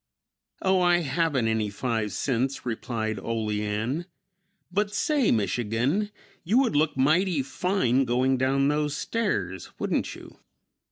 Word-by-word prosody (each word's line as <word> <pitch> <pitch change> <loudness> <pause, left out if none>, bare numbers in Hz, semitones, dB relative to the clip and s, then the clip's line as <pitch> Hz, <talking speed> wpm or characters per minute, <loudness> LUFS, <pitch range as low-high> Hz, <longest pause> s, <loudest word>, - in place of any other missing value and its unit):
"Oh, 190 -1 +3
I 175 -1 +4
haven't 145 -5 +1
any 110 -2 0
five 110 0 -2
cents," 130 +1 -1
replied 110 -2 -3
Olean, 110 - -2 0.6
"but 205 +2 0
say, 295 -5 +2
Michigan, 120 - 0 0.3
you 210 +8 +2
would 255 - +3
look 150 -1 +2
mighty 155 +3 +3
fine 135 -4 +1
going 130 +2 +2
down 135 +2 +2
those 150 0 0
stairs, 100 - -2
wouldn't - - -1
you?" - - -13
135 Hz, 120 wpm, -26 LUFS, 115-175 Hz, 0.6 s, I